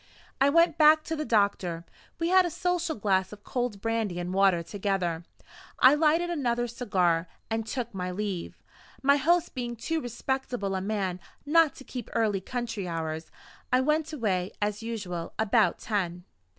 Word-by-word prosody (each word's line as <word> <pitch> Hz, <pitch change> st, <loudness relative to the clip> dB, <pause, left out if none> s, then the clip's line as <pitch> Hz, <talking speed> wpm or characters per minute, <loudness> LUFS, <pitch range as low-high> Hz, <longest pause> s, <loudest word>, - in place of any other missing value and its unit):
I 275 Hz, -, +6 dB
went 335 Hz, +1 st, +4 dB
back 310 Hz, 0 st, +7 dB
to 320 Hz, -, -3 dB
the 305 Hz, 0 st, -3 dB
doctor; 200 Hz, -7 st, +1 dB, 0.3 s
we 335 Hz, 0 st, 0 dB
had 375 Hz, 0 st, +6 dB
a 350 Hz, -, -1 dB
social 350 Hz, 0 st, -1 dB
glass 195 Hz, -3 st, +1 dB
of 205 Hz, 0 st, -11 dB
cold 245 Hz, -5 st, -3 dB
brandy 225 Hz, -5 st, -1 dB
and 175 Hz, +1 st, -3 dB
water 190 Hz, -3 st, +3 dB
together; 180 Hz, -3 st, -2 dB, 0.5 s
I 255 Hz, +2 st, +7 dB
lighted 325 Hz, +3 st, +2 dB
another 240 Hz, -7 st, 0 dB
cigar, 185 Hz, -8 st, 0 dB, 0.2 s
and 225 Hz, 0 st, -1 dB
took 240 Hz, -2 st, -4 dB
my 180 Hz, -1 st, -3 dB
leave. 190 Hz, -1 st, -4 dB, 0.5 s
My 280 Hz, +1 st, +5 dB
host 340 Hz, +5 st, +2 dB
being 240 Hz, -2 st, -4 dB
too 320 Hz, +8 st, -2 dB
respectable 245 Hz, -4 st, -3 dB
a 190 Hz, -, -1 dB
man 195 Hz, -3 st, -2 dB, 0.3 s
not 315 Hz, -1 st, +4 dB
to -, -, -11 dB
keep 250 Hz, -4 st, -7 dB
early 210 Hz, -4 st, +1 dB
country 230 Hz, -3 st, -4 dB
hours, 160 Hz, -1 st, -4 dB, 0.4 s
I 255 Hz, +1 st, +4 dB
went 305 Hz, +3 st, +1 dB
away, 195 Hz, -, -1 dB
as 205 Hz, +1 st, -1 dB
usual, 200 Hz, -7 st, -5 dB
about 220 Hz, -3 st, +3 dB
ten. 180 Hz, -5 st, -2 dB
225 Hz, 165 wpm, -28 LUFS, 190-280 Hz, 0.5 s, back